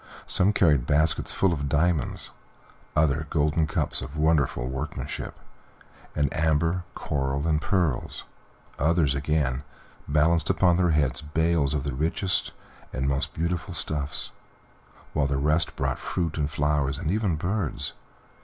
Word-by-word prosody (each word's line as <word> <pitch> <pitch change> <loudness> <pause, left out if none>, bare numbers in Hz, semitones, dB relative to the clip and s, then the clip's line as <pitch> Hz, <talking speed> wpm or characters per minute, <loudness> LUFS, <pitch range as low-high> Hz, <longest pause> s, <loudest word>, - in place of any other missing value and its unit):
Some 95 +3 +4
carried 75 - +3
baskets 80 +2 +3
full 95 -3 +2
of 70 -3 -3
diamonds, 75 -1 0 0.6
others 75 0 +2
golden 75 0 +1
cups - - 0
of 70 +5 -7
wonderful 75 -6 +2
workmanship, 65 +3 -5 0.8
and 75 -1 +2
amber, 80 +3 +1
coral, 70 0 -2
and 80 -1 +1
pearls, 85 -10 -1 0.6
others, 80 -1 +3
again, 70 -2 0 0.5
balanced 75 +2 +2
upon 90 -2 +3
their 90 -1 +3
heads 70 -5 +1
bales 75 -1 +1
of 70 - -1
the 70 -2 -3
richest 85 +6 0 0.4
and 65 +1 -2
most 70 0 -1
beautiful 85 +1 -2
stuffs, 75 -3 -2 0.8
while 70 -2 +2
the 70 -1 0
rest 75 +4 +1
brought 65 -1 -1
fruit 85 -4 -2
and 75 -2 -1
flowers, 75 -2 0
and 80 +2 -2
even 100 -4 +1
birds. 90 0 -2
75 Hz, 135 wpm, -26 LUFS, 70-85 Hz, 0.8 s, Some